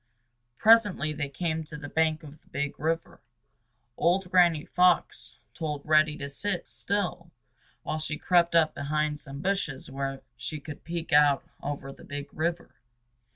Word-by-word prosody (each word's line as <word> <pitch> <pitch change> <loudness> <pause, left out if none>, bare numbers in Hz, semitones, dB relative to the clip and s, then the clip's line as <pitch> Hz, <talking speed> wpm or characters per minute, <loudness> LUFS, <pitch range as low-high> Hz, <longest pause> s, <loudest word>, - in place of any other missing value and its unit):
Presently 205 -9 +5
they 145 -2 -3
came 160 +2 -2
to 150 0 -8
the 145 -1 -7
bank 160 +1 +1
of 150 0 -12
the - - -34
Big 145 +1 -3
River. 165 +2 -2 0.8
Old 180 +1 +2
Granny 170 -4 +4
Fox 180 -1 +2 0.2
told 150 -3 -4
Reddy 155 0 +4
to 140 - -5
sit 175 +6 -3
still 180 -4 -2 0.5
while 155 - -2
she 155 -1 -3
crept 170 -1 +3
up 160 -2 +4
behind 150 +1 -1
some 140 -1 -8
bushes 185 -9 -2
where 135 0 -4
she 140 +5 -5
could 145 0 -9
peek 170 -2 -4
out 145 -2 +5 0.2
over 140 -1 -5
the - - -16
Big 145 0 -7
River. 170 +2 -2
155 Hz, 155 wpm, -28 LUFS, 145-170 Hz, 0.8 s, Presently